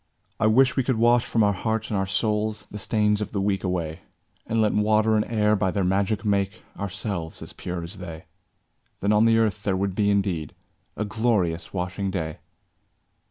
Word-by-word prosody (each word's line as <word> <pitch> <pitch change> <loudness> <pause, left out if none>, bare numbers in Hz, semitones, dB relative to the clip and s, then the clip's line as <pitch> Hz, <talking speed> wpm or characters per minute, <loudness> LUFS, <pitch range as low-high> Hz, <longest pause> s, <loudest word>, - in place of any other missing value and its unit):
I 110 - +3
wish 130 +4 +4
we 135 - +3
could 130 0 +1
wash 120 +1 +4
from 115 - +2
our 100 0 +3
hearts 110 +3 -2
and - - 0
our 95 - -1
souls 105 +1 -1
The 105 - -6
stains 105 0 +1
of 105 - -4
the 100 - 0
week 95 -1 0
away, 85 -3 -2 0.5
And 115 - 0
let 110 -1 +3
water 110 +1 +3
and 105 - +3
air 105 -2 +2
by 95 -2 +1
their 100 +1 0
magic 100 +3 0
make 100 0 0
Ourselves 95 -4 -4
as - - -8
pure 90 -1 -5
as 85 +5 -8
they; 85 -3 -8 0.8
Then 100 +2 +2
on 105 +1 +5
the 115 0 +5
earth 110 -2 +1
there 95 -2 0
would 95 0 -1
be 100 +2 +1
indeed 95 -7 0 0.4
A 105 - -1
glorious 105 -7 0
washing 95 +1 -2
day! 80 -5 -3
100 Hz, 195 wpm, -25 LUFS, 95-110 Hz, 0.8 s, on